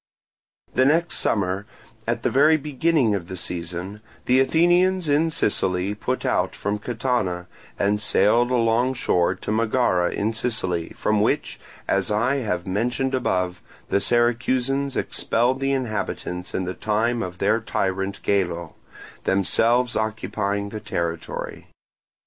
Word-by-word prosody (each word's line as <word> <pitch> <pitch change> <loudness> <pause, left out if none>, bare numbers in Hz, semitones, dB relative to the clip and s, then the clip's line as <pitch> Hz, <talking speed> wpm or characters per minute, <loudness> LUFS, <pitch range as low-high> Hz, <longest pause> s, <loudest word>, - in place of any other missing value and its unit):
The 130 - +3
next 165 +5 +2
summer, 100 0 0 0.4
at - - -1
the - - +1
very 150 +4 +5
beginning 150 -4 +1
of 90 -4 -3
the 95 -1 -6
season, 90 +4 -5 0.2
the 125 +1 +4
Athenians 175 +5 +3
in 150 +3 +3
Sicily 95 - 0
put 125 +5 -3
out - - 0
from 105 +1 -2
Catana, 110 -6 -1 0.3
and 105 +1 +1
sailed 110 +4 +3
along 120 +1 +2
shore 90 -6 +1
to 100 - -5
Megara 110 -5 +2
in 110 +3 -1
Sicily, 95 -8 -1
from 105 -1 +1
which, - - 0 0.3
as 100 +2 +1
I 115 +6 +1
have 95 -9 -2
mentioned 120 +7 -1
above, 90 -8 -1 0.3
the 100 - +2
Syracusans 125 +4 +1
expelled 125 +3 0
the 135 0 0
inhabitants 105 -7 -3
in 95 - -1
the 90 - -3
time 115 +4 0
of 90 -1 -5
their 105 +4 +2
tyrant 95 -3 -2
Gelo, 85 -5 0 0.5
themselves 115 +6 +2
occupying 105 -2 -2
the 110 - -6
territory. 85 -5 -4
110 Hz, 130 wpm, -23 LUFS, 95-130 Hz, 0.5 s, very